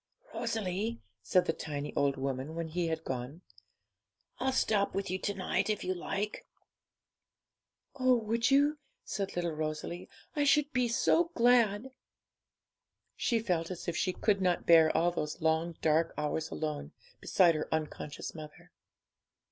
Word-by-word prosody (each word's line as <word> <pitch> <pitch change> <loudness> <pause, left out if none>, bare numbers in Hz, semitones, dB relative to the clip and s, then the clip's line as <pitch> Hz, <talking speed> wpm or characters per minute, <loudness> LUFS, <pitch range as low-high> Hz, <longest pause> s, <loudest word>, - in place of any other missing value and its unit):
'Rosalie,' 220 +2 -2 0.2
said 185 -2 +3
the 160 - 0
tiny 145 -2 -5
old 140 -1 +1
woman 135 +3 -3
when 165 -1 -3
he 170 +1 -1
had 160 0 -2
gone, 130 +5 -5 1.0
'I'll 265 - +1
stop 215 -6 +1
with 195 -2 -2
you 185 - -1
to 205 +1 -2
night, 190 +3 -1
if 215 - -1
you 185 - 0
like.' 200 +3 -4 1.5
'Oh 255 -1 +5
would 230 0 +1
you?' 285 +2 +3 0.3
said 195 0 -3
little 175 -1 -1
Rosalie; 155 +3 -4 0.3
'I 295 - +2
should 295 +1 +3
be 250 -2 +2
so 260 +8 +3
glad!' 235 -1 +3 1.2
She 235 - +1
felt 180 -7 -1
as 180 -2 -7
if 170 - -1
she 185 - +1
could 200 +1 +1
not 180 -2 +1
bear 165 -2 +7
all 175 +1 +3
those 150 -2 -4
long, 160 +1 +1
dark 160 +1 +2
hours 150 +1 -2
alone, 150 - -4 0.3
beside 175 -3 +4
her 155 - -3
unconscious 155 -1 -4
mother. 155 -2 -11
175 Hz, 150 wpm, -31 LUFS, 160-220 Hz, 1.5 s, bear